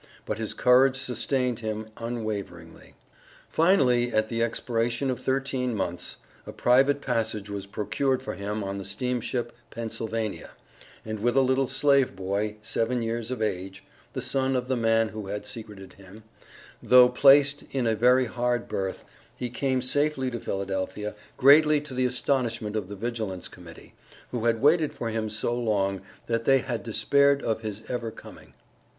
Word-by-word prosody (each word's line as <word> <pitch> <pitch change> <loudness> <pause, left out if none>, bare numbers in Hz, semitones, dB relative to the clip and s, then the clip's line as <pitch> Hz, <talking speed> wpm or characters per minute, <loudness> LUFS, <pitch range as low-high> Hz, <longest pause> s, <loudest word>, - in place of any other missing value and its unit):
But 105 - -3
his 110 - -3
courage 130 +1 +5
sustained 125 -1 -1
him 110 -1 -4
unwaveringly. 105 -8 -6 0.6
Finally 130 -9 +3
at 110 -1 +1
the 115 -1 -1
expiration 115 +2 -1
of 125 - -4
thirteen 130 -2 -1
months, 90 -3 -4 0.3
a - - -5
private 135 +3 +3
passage 110 -4 -2
was 100 -1 -5
procured 110 +6 -1
for - - -4
him 105 +3 -4
on 100 0 -4
the - - -6
steamship 120 +3 -2 0.2
Pennsylvania, 115 -1 -4 0.6
and 110 -1 -4
with 120 +4 +1
a - - +7
little 130 0 +2
slave 140 -5 +2
boy, 100 +3 -2
seven 115 +2 -1
years 115 0 -3
of 125 -3 -2
age, 95 -2 -4 0.3
(the - - -3
son 135 -1 0
of 125 0 -1
the 130 - +1
man 115 -1 +2
who 110 -2 -7
had 105 +1 -5
secreted 105 -4 -7
him) 100 +3 -15 0.6
though 125 0 +7
placed 140 +3 +5
in 130 -3 -1
a 115 - +2
very 125 +3 +4
hard 120 0 -1
berth, 95 -1 -4 0.3
he 125 -1 -4
came 130 0 0
safely 135 -1 0
to 120 - -4
Philadelphia, 95 +1 -3 0.2
greatly 150 +3 +6
to 145 -2 -9
the 130 0 +1
astonishment 120 -4 -1
of 100 -3 -3
the 100 - -6
Vigilance 110 -4 -3
Committee, - - -14 0.4
who 120 -2 -3
had 115 +1 +1
waited 155 +1 +4
for 115 - -3
him 110 -1 -2
so 110 +2 -1
long 100 -5 0 0.2
that 115 0 -1
they 135 -1 +6
had 125 -3 -3
despaired 140 +6 +2
of 110 -1 -1
his 110 -1 -5
ever 120 -2 -3
coming. - - -14
115 Hz, 160 wpm, -26 LUFS, 105-130 Hz, 0.6 s, a